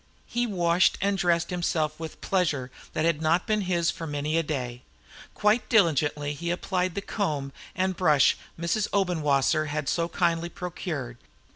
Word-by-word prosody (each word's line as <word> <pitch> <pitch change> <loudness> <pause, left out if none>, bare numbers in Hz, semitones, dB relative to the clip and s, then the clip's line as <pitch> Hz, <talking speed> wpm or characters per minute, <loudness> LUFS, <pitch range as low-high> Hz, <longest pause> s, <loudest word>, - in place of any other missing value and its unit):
He 240 0 -1
washed 175 -3 +3
and 200 +1 +1
dressed 175 -2 +1
himself 160 -3 -1
with 160 -1 -7
pleasure 150 -9 0 0.2
that 155 - 0
had 165 -2 +1
not 165 +3 +2
been 215 -1 +1
his 175 -3 +1
for 165 -3 -7
many 150 +1 -2
a 165 - +4
day. 125 -6 -4 0.5
Quite 215 +2 +2
diligently 150 - +2
did 145 - -7
he 170 0 -3
apply 180 +1 0
the 185 +2 -5
comb 150 -10 -2 0.2
and 185 0 0
brush 155 -7 +4 0.2
Mrs. 180 +5 0
Obenwasser 155 -6 +2
had 145 -1 -3
so 170 +2 0
kindly 170 -1 0
procured. 160 -9 -5
170 Hz, 160 wpm, -27 LUFS, 150-185 Hz, 0.5 s, a